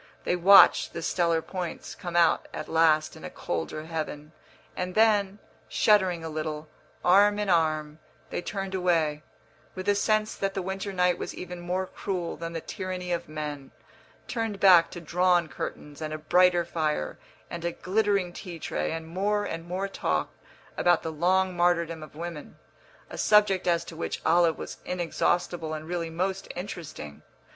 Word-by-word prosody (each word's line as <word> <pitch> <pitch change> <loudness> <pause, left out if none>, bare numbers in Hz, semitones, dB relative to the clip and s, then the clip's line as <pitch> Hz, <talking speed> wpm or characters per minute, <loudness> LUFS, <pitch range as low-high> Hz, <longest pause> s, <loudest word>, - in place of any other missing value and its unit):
They - - +1
watched 190 +3 +7
the 170 - -5
stellar 170 -2 +1
points 180 -3 -5
come 175 -1 -7
out 170 -2 +3
at - - -5
last 160 -1 +3
in - - -13
a - - -5
colder 85 - -4
heaven, 155 -2 -5 0.4
and 180 0 -4
then, 210 -3 +3 0.3
shuddering 190 -5 +3
a - - -4
little, 155 0 -4 0.4
arm 205 +3 +5
in 205 -2 0
arm, 155 -2 +1 0.3
they - - -2
turned 195 0 -4
away, 165 -5 +1 0.5
with 185 0 -6
a 205 - +5
sense 215 +1 +1
that 195 0 -3
the 190 - -2
winter 190 +2 -4
night 180 -2 +1
was - - -5
even 180 -1 -7
more 180 +2 -2
cruel 180 -2 -4
than 165 0 -6
the 165 - -4
tyranny 185 0 -5
of 170 -2 -2
men 150 -3 -5 0.6
turned 225 -4 -3
back 180 -4 +7
to 175 - -8
drawn 175 +1 +2
curtains 150 +1 -7
and 155 0 -3
a - - -4
brighter 175 +2 +3
fire 155 - -2 0.3
and 170 -1 -5
a 170 - 0
glittering 200 -1 0
tea 175 -2 -8
tray - - -3
and 160 0 -5
more 205 +4 0
and 165 -2 -5
more 185 +3 -2
talk 195 - -1 0.5
about 175 -1 +3
the 160 - -3
long 185 +4 +1
martyrdom 170 -2 +1
of 155 - -11
women, 165 -2 -7 0.5
a - - -7
subject 205 -4 +4
as 170 -1 +2
to 165 - -9
which 165 - -4
Olive 165 0 +4
was - - -7
inexhaustible 175 -2 -1
and 155 0 -7
really 170 -1 -3
most 185 +4 -2
interesting. 165 - -7
175 Hz, 170 wpm, -27 LUFS, 160-190 Hz, 0.6 s, watched